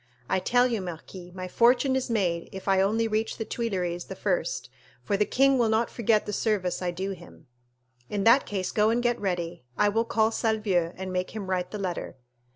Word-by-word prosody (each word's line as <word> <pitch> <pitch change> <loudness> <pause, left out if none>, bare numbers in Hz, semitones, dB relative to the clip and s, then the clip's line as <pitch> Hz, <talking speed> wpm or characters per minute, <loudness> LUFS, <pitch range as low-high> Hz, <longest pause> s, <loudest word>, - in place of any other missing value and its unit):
I 190 - +1
tell 245 +6 +3
you, 235 -5 0
marquis, 180 +1 -8
my 185 -1 -5
fortune 245 +6 +3
is 265 -1 -1
made 180 -7 0
if 190 +1 -9
I 190 -1 +4
only 220 +4 +2
reach 220 +1 -1
the 225 - -3
Tuileries 180 -8 -2
the - - -7
first, - - -1 0.4
for 205 - 0
the 210 +1 +1
king 270 0 +3
will 230 -2 +3
not 220 +1 +1
forget 220 -2 +2
the 210 - -4
service 200 -5 0
I 180 - -1
do 190 +3 -3
him." 175 -3 -12 0.6
"In 205 -1 -1
that 235 +6 +5
case 190 -3 -2
go 215 0 +3
and 235 +2 +1
get 240 -1 +1
ready. 175 -5 -2
I 210 - +4
will 225 +3 +1
call 220 -1 +2
Salvieux 210 -7 0
and 185 0 -5
make 185 +3 -2
him 195 -3 -4
write 180 -1 -1
the 210 - -5
letter." 185 -8 -4
205 Hz, 210 wpm, -27 LUFS, 185-230 Hz, 0.6 s, that